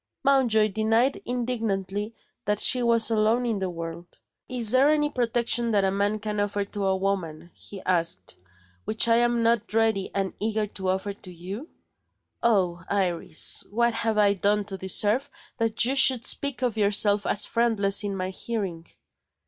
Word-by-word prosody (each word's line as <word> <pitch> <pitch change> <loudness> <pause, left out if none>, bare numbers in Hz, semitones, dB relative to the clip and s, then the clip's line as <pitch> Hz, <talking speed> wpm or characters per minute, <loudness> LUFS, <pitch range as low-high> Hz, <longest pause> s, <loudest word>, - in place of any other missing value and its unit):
Mountjoy 240 -6 +3
denied 225 +6 0
indignantly 220 -4 -3 0.3
that 210 0 -1
she 255 - +5
was 230 -1 +4
alone 225 +3 +1
in 225 -4 -2
the 190 -1 -3
world. 170 0 -8 0.4
"Is 240 -4 +2
there 265 +3 +4
any 295 -1 +1
protection 240 -2 +1
that 200 -1 +2
a 190 - +1
man 200 +2 -1
can 210 0 -5
offer 205 0 -2
to 200 -1 -4
a 190 0 +1
woman," 175 -4 -4
he 200 -2 -11
asked, 170 - -2 0.5
"which 220 - +1
I 230 0 +3
am 240 0 +1
not 230 -2 0
ready 220 -4 +1
and 195 -1 -2
eager 215 0 -1
to 190 -2 -6
offer 190 +2 -2
to 185 -2 -12
You? 190 - -9 0.7
Oh, 185 -7 0
Iris, 180 -5 +2
what 235 +2 +1
have 225 -1 -1
I 205 -1 +4
done 205 +1 0
to 195 -1 -7
deserve 210 +8 +2 0.3
that 225 0 +1
you 260 - 0
should 260 -3 +4
speak 280 -2 -2
of 235 -3 -1
yourself 205 0 +2
as 210 - +3
friendless 215 -4 +1
in 200 -1 -4
my 185 0 -4
hearing!" 190 -6 -5
210 Hz, 165 wpm, -25 LUFS, 195-235 Hz, 0.7 s, she